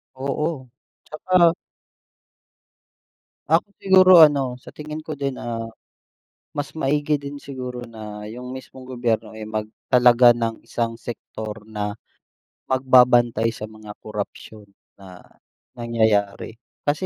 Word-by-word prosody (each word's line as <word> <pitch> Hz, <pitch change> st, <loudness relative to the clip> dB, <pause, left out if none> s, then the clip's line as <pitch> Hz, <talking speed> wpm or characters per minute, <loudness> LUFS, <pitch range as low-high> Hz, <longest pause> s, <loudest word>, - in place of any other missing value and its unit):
Oo. 135 Hz, +1 st, -3 dB, 0.4 s
'Tsaka 170 Hz, +1 st, +3 dB, 2.0 s
Ako 165 Hz, +4 st, +3 dB
siguro 185 Hz, -1 st, +6 dB
ano, 135 Hz, -4 st, -1 dB
sa 125 Hz, -, -14 dB
tingin 155 Hz, +1 st, -7 dB
ko 155 Hz, -, -4 dB
din, 140 Hz, -2 st, -3 dB
ah, 115 Hz, -1 st, -5 dB, 0.9 s
mas 145 Hz, -2 st, -3 dB
maigi 145 Hz, +1 st, +1 dB
din 140 Hz, 0 st, -7 dB
siguro 125 Hz, -3 st, -6 dB
na 105 Hz, -2 st, -9 dB
yung 125 Hz, +2 st, -8 dB
mismong 130 Hz, 0 st, -11 dB
gobyerno 115 Hz, -3 st, -2 dB
ay 110 Hz, -, -7 dB
magtalaga 120 Hz, +3 st, +4 dB
ng 115 Hz, -1 st, -3 dB
isang 115 Hz, -1 st, -3 dB
sektor 110 Hz, -2 st, -8 dB
na 105 Hz, -1 st, -4 dB, 0.7 s
magbabantay 125 Hz, -3 st, +4 dB
sa 110 Hz, -1 st, -7 dB
mga 110 Hz, -1 st, -11 dB
korapsiyon 105 Hz, 0 st, -7 dB, 0.3 s
na 95 Hz, -2 st, -13 dB, 0.6 s
nangyayari. 110 Hz, -2 st, 0 dB, 0.2 s
Kasi 150 Hz, +6 st, -1 dB
120 Hz, 110 wpm, -22 LUFS, 110-140 Hz, 2.0 s, siguro